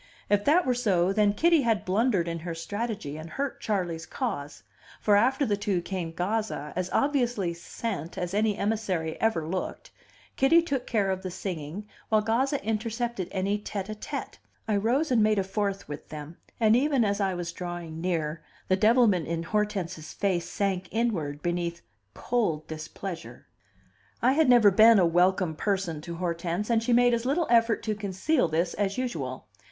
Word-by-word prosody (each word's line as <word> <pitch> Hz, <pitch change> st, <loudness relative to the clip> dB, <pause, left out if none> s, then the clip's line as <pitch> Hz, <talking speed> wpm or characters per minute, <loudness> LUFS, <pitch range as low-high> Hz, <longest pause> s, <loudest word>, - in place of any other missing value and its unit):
If 205 Hz, 0 st, +3 dB
that 335 Hz, +5 st, +4 dB
were 255 Hz, -, +2 dB
so, 195 Hz, -7 st, +2 dB
then 205 Hz, -1 st, +3 dB
Kitty 335 Hz, +4 st, +4 dB
had 225 Hz, -4 st, +1 dB
blundered 195 Hz, -2 st, +1 dB
in 165 Hz, 0 st, -3 dB
her 165 Hz, 0 st, -5 dB
strategy 205 Hz, -4 st, -4 dB
and 160 Hz, +1 st, -8 dB
hurt 275 Hz, +5 st, -4 dB
Charley's 175 Hz, -6 st, -2 dB
cause; 160 Hz, -, -4 dB, 0.4 s
for 205 Hz, -, +3 dB
after 265 Hz, +7 st, +3 dB
the 210 Hz, -4 st, +1 dB
two 200 Hz, -2 st, -1 dB
came 175 Hz, -1 st, -4 dB
Gazza, 180 Hz, -4 st, -2 dB
as 185 Hz, 0 st, -2 dB
obviously 245 Hz, -10 st, +1 dB
"sent" 170 Hz, -1 st, -5 dB
as 180 Hz, 0 st, -3 dB
any 210 Hz, 0 st, +1 dB
emissary 195 Hz, -7 st, -1 dB
ever 220 Hz, -8 st, +1 dB
looked: 185 Hz, +2 st, -4 dB, 0.5 s
Kitty 330 Hz, +5 st, +5 dB
took 275 Hz, -6 st, -2 dB
care 205 Hz, -5 st, +1 dB
of 190 Hz, 0 st, -2 dB
the 185 Hz, -, -4 dB
singing, 180 Hz, +1 st, -5 dB, 0.2 s
while 215 Hz, -1 st, +4 dB
Gazza 255 Hz, +3 st, 0 dB
intercepted 225 Hz, -2 st, -2 dB
any 200 Hz, +2 st, 0 dB
tete 205 Hz, -1 st, -5 dB
a -, -, -2 dB
tete. 215 Hz, -, -6 dB, 0.3 s
I 215 Hz, -, +1 dB
rose 250 Hz, +9 st, +1 dB
and 235 Hz, -3 st, +4 dB
made 215 Hz, 0 st, +3 dB
a 195 Hz, -, +2 dB
fourth 195 Hz, 0 st, -2 dB
with 145 Hz, 0 st, -8 dB
them, 155 Hz, +2 st, -8 dB, 0.2 s
and 220 Hz, -1 st, +5 dB
even 270 Hz, -2 st, +3 dB
as 200 Hz, 0 st, 0 dB
I 190 Hz, -2 st, +1 dB
was 175 Hz, -1 st, -4 dB
drawing 175 Hz, -2 st, -6 dB
near, 165 Hz, -3 st, -1 dB, 0.3 s
the 185 Hz, -, +5 dB
devilment 215 Hz, -4 st, +4 dB
in 165 Hz, 0 st, -2 dB
Hortense's 185 Hz, -5 st, -2 dB
face 185 Hz, -4 st, -1 dB
sank 190 Hz, -2 st, -1 dB
inward 170 Hz, -11 st, -1 dB
beneath 175 Hz, -1 st, -2 dB, 0.3 s
cold 190 Hz, -11 st, -1 dB
displeasure. 165 Hz, +3 st, -7 dB, 0.7 s
I 250 Hz, -, +4 dB
had 305 Hz, 0 st, +3 dB
never 235 Hz, -5 st, +7 dB
been 220 Hz, +3 st, +7 dB
a 185 Hz, -, +5 dB
welcome 175 Hz, 0 st, +2 dB
person 185 Hz, -4 st, -1 dB
to 170 Hz, +2 st, -6 dB
Hortense, 175 Hz, +4 st, -2 dB
and 225 Hz, -1 st, +3 dB
she 235 Hz, +2 st, -1 dB
made 245 Hz, 0 st, +5 dB
as 230 Hz, -1 st, 0 dB
little 290 Hz, +7 st, +1 dB
effort 230 Hz, -1 st, +3 dB
to 215 Hz, -, 0 dB
conceal 205 Hz, -, 0 dB
this 165 Hz, +2 st, 0 dB
as 200 Hz, +1 st, -1 dB
usual. 150 Hz, -, -3 dB
200 Hz, 175 wpm, -27 LUFS, 170-230 Hz, 0.7 s, never